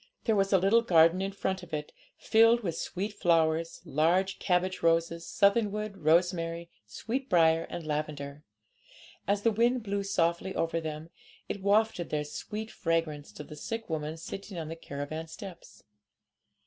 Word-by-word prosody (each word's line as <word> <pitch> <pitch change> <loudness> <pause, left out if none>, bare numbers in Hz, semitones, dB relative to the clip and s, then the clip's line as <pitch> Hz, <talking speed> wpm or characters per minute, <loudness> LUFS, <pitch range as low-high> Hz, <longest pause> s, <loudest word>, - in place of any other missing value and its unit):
There 225 - +2
was 195 -1 +2
a 195 - +6
little 195 +5 +4
garden 170 -3 +5
in 195 +1 -2
front 190 -1 -2
of 175 -3 -5
it, 150 0 -6 0.2
filled 230 +1 +4
with 175 -7 -3
sweet 200 +3 -4
flowers, 165 -3 +1
large 170 +5 +1
cabbage 185 0 0
roses, 165 0 +1
southernwood, 210 0 +1
rosemary, 170 0 +1 0.2
sweetbriar, 165 - +1
and 170 - -6
lavender. 150 -1 -4 0.8
As 200 +1 +1
the 230 - +4
wind 235 +3 +2
blew 200 -1 -1
softly 190 -1 0
over 165 0 0
them, 155 +1 -6 0.4
it 200 - -4
wafted 200 -2 +2
their 150 -1 -1
sweet 215 +8 -6
fragrance 155 -6 -2
to 150 - -8
the 150 - -10
sick 225 +5 -5
woman 155 0 -3
sitting 195 +3 -7
on 160 -2 -4
the 165 - -5
caravan 155 +1 -6
steps. 175 +2 -11
170 Hz, 150 wpm, -29 LUFS, 160-200 Hz, 0.8 s, a